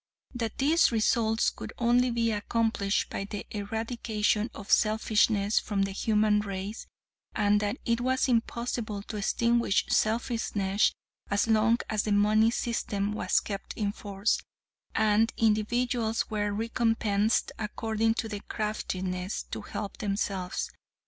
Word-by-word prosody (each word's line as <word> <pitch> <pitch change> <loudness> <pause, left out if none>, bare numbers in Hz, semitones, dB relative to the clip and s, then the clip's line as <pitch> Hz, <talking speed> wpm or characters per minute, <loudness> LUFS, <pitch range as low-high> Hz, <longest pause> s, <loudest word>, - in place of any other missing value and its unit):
That 230 -3 -3
these 310 +3 +4
results 225 0 +2
could - - -8
only 245 +1 +3
be 230 -1 +1
accomplished 210 -1 0
by 195 - -3
the 205 0 -6
eradication 220 +1 -1
of 205 -1 -8
selfishness 215 -1 +3
from 200 -2 -1
the 195 - -2
human 210 +1 +2
race, 200 +1 -5 0.5
and 205 0 +3
that 210 +4 -1
it 235 -1 +1
was 260 +1 +1
impossible 235 -3 -1
to 215 - -6
extinguish 235 +1 +2
selfishness 215 -3 +1 0.4
as 200 0 +2
long 225 +1 +4
as 215 -1 0
the 210 - -2
money 215 +2 +4
system 210 -4 -1
was 185 -3 +2
kept 200 -2 -6
in 205 -2 -1
force, 205 0 -1 0.5
and 220 +1 +3
individuals 225 +1 +1
were 205 -1 0
recompensed 225 -1 +1
according 225 +1 0
to 230 - -2
their 210 -2 -5
craftiness 190 -3 -3
to - - -4
help 205 -2 -6
themselves. 195 -2 -2
215 Hz, 130 wpm, -28 LUFS, 205-230 Hz, 0.5 s, these